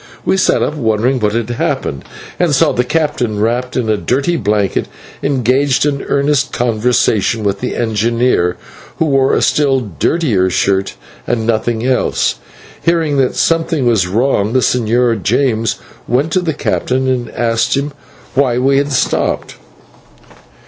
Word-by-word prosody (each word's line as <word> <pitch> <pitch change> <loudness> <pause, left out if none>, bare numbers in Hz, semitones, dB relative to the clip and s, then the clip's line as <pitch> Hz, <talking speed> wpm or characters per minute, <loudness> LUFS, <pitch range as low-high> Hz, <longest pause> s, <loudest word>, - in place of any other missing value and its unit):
We - - +2
sat 190 - +2
up - - -1
wondering 120 -1 0
what 105 -2 0
had 115 0 -2
happened, 70 - -2 0.4
and 170 -5 +2
saw 150 +2 +3
the 125 - 0
captain, 125 -6 -1
wrapped 120 +4 -1
in 120 -3 -1
a 110 -1 +1
dirty 140 +11 0
blanket, 105 - 0 0.3
engaged 135 +1 +1
in 140 -2 -1
earnest 140 0 +1
conversation 115 -2 +1
with 100 -1 -1
the - - -3
engineer, 115 -4 +1 0.4
who 165 - +1
wore 135 -3 +2
a - - +1
still 140 -3 +2
dirtier 105 - 0
shirt, 95 -1 0 0.3
and 115 -2 -1
nothing 115 +1 -1
else. 125 - 0 0.4
Hearing 165 -4 +1
that 130 -2 +1
something 165 -4 +1
was 110 -7 +2
wrong, 110 +1 0
the 130 - +3
Señor 120 -2 +1
James 115 +1 +1 0.3
went 135 +7 0
to 185 - +2
the 160 -4 -2
captain 130 -3 -1
and 125 -2 -1
asked 115 +2 0
him 140 +1 -3 0.4
why 130 -3 +2
we 135 +2 +2
had 145 0 -2
stopped. 135 - -1
125 Hz, 150 wpm, -15 LUFS, 110-140 Hz, 0.4 s, saw